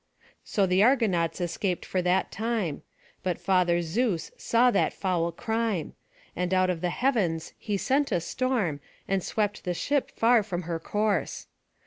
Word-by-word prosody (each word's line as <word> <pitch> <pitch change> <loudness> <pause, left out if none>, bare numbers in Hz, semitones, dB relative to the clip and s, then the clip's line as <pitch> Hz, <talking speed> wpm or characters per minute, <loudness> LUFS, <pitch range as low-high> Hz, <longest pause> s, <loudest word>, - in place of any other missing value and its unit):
So 200 - +1
the 185 +1 +3
Argonauts 210 - +2
escaped 175 +1 -2
for 185 - -1
that 180 +1 +1
time; 220 -9 -2 0.4
but 180 -2 -1
Father 175 -3 +2
Zeus 185 0 -1
saw 245 +2 +3
that 200 - +1
foul 175 -3 0
crime; 220 -2 -2 0.4
and 180 +1 0
out 185 0 +3
of 170 -3 -4
the 180 - 0
heavens 190 -9 0
he 205 -2 -2
sent 270 +8 +1
a - - +2
storm, 210 - -1 0.3
and 195 -2 0
swept 210 -1 -1
the 180 -2 -2
ship 285 +9 0
far 230 0 +4
from 185 -4 -4
her 165 0 -3
course. 210 +3 -1
190 Hz, 155 wpm, -27 LUFS, 175-225 Hz, 0.4 s, far